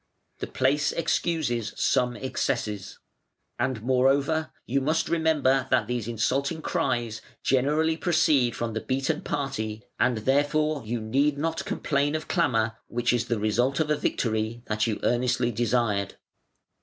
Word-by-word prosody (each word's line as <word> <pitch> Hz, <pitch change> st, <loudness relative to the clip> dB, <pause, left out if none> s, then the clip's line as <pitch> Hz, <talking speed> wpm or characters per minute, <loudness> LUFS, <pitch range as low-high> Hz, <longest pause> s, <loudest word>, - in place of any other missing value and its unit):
The -, -, -4 dB
place 140 Hz, +3 st, +1 dB
excuses 155 Hz, -9 st, -1 dB
some 125 Hz, -1 st, +1 dB
excesses. 115 Hz, -6 st, -3 dB, 0.6 s
And 120 Hz, -3 st, -1 dB
moreover 135 Hz, +5 st, +2 dB
you 135 Hz, +3 st, 0 dB
must 155 Hz, +4 st, +1 dB
remember 150 Hz, -5 st, +2 dB
that 120 Hz, -4 st, +3 dB
these 120 Hz, -1 st, -3 dB
insulting 140 Hz, +7 st, -1 dB
cries 120 Hz, -9 st, -1 dB, 0.2 s
generally 150 Hz, +5 st, +2 dB
proceed 155 Hz, -8 st, +2 dB
from 115 Hz, -1 st, -3 dB
the 110 Hz, -, -2 dB
beaten 135 Hz, +4 st, -1 dB
party: 110 Hz, -7 st, -3 dB, 0.2 s
and 125 Hz, -3 st, +2 dB
therefore 145 Hz, +5 st, +1 dB
you 120 Hz, +1 st, -1 dB
need 140 Hz, +7 st, +1 dB
not 165 Hz, +2 st, -2 dB
complain 145 Hz, +1 st, 0 dB
of 155 Hz, -, -4 dB
clamour 115 Hz, -, +1 dB
which 120 Hz, +1 st, 0 dB
is 120 Hz, 0 st, 0 dB
the 120 Hz, -, 0 dB
result 120 Hz, +6 st, +1 dB
of 155 Hz, -1 st, +1 dB
a -, -, +4 dB
victory 115 Hz, -4 st, -1 dB
that 105 Hz, +1 st, 0 dB
you 110 Hz, -, -2 dB
earnestly 120 Hz, 0 st, +1 dB
desired". 115 Hz, -4 st, 0 dB
130 Hz, 140 wpm, -26 LUFS, 115-150 Hz, 0.6 s, a